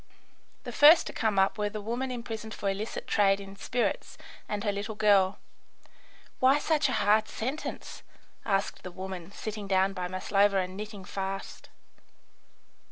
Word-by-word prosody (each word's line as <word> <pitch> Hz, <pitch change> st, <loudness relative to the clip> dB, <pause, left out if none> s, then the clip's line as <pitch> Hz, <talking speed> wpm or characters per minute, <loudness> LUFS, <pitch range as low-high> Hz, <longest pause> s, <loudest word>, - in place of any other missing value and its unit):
The -, -, -6 dB
first 310 Hz, +3 st, +7 dB
to -, -, -6 dB
come 220 Hz, -4 st, 0 dB
up 195 Hz, +2 st, +2 dB
were 210 Hz, 0 st, 0 dB
the 215 Hz, -, -6 dB
woman 240 Hz, +5 st, -3 dB
imprisoned 225 Hz, -3 st, -6 dB
for 200 Hz, -, -4 dB
illicit 205 Hz, +3 st, -5 dB
trade 200 Hz, -1 st, +3 dB
in 195 Hz, 0 st, -10 dB
spirits, 240 Hz, +4 st, -2 dB, 0.3 s
and 205 Hz, -1 st, -2 dB
her 205 Hz, -, +1 dB
little 205 Hz, +2 st, -4 dB
girl. 200 Hz, -2 st, +4 dB, 1.0 s
"Why 265 Hz, +2 st, +5 dB
such 300 Hz, -1 st, +1 dB
a -, -, -1 dB
hard 215 Hz, 0 st, +3 dB
sentence?" 265 Hz, +7 st, -5 dB, 0.4 s
asked 195 Hz, 0 st, -1 dB
the 185 Hz, -, -7 dB
woman, 185 Hz, -1 st, -7 dB
sitting 210 Hz, 0 st, -6 dB
down 190 Hz, 0 st, +2 dB
by 180 Hz, -2 st, -3 dB
Maslova 195 Hz, +2 st, +2 dB
and 185 Hz, 0 st, -2 dB
knitting 205 Hz, -1 st, -7 dB
fast. 195 Hz, 0 st, -5 dB
205 Hz, 155 wpm, -29 LUFS, 195-220 Hz, 1.0 s, first